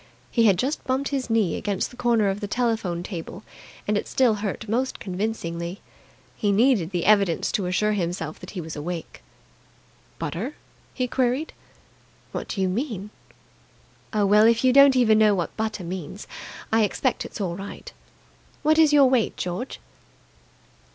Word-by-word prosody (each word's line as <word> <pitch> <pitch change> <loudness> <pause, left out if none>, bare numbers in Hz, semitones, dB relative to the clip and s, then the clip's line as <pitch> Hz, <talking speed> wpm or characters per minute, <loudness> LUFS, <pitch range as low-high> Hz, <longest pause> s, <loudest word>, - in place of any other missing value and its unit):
He 230 -2 +3
had 195 -3 +4
just 270 - -1
bumped 265 +2 0
his 270 -3 -2
knee 220 -7 +2
against 200 -2 -2
the - - -13
corner 235 -4 +2
of 195 +1 -2
the 205 - -4
telephone 220 -7 -1
table, 180 +1 -7 0.4
and 210 - +1
it 205 - -1
still 255 -4 +3
hurt 215 +2 -4
most 250 +5 -1
convincingly. 180 -2 -4 0.6
He 205 - 0
needed 210 -5 +3
the 180 -3 -2
evidence 200 -5 +3
to 190 -3 -1
assure 210 +4 +1
himself 170 -5 -3
that 180 - -10
he 185 - -5
was 160 -1 -7
awake. 165 +2 -6 1.0
"Butter?" 230 - -4 0.4
he 255 -1 0
queried. 255 +4 0 0.8
"What - - -5
do 195 - -3
you 190 - +2
mean?" 210 -1 -3 1.0
"Oh, 210 -1 +2
well, 210 +2 +6
if 230 +1 +3
you 255 -1 +5
don't 275 0 +7
even 220 -4 +4
know 210 -2 +5
what 175 -3 -3
butter 220 -3 -3
means, 180 +2 -6 0.5
I 225 - +5
expect 245 +5 0
it's - - -8
all 180 -4 -2
right. 195 +2 -8 0.7
What 310 +1 +4
is 315 -2 +6
your 290 -2 +7
weight, 255 -4 +1
George?" 180 +9 -4
210 Hz, 165 wpm, -24 LUFS, 185-245 Hz, 1.0 s, don't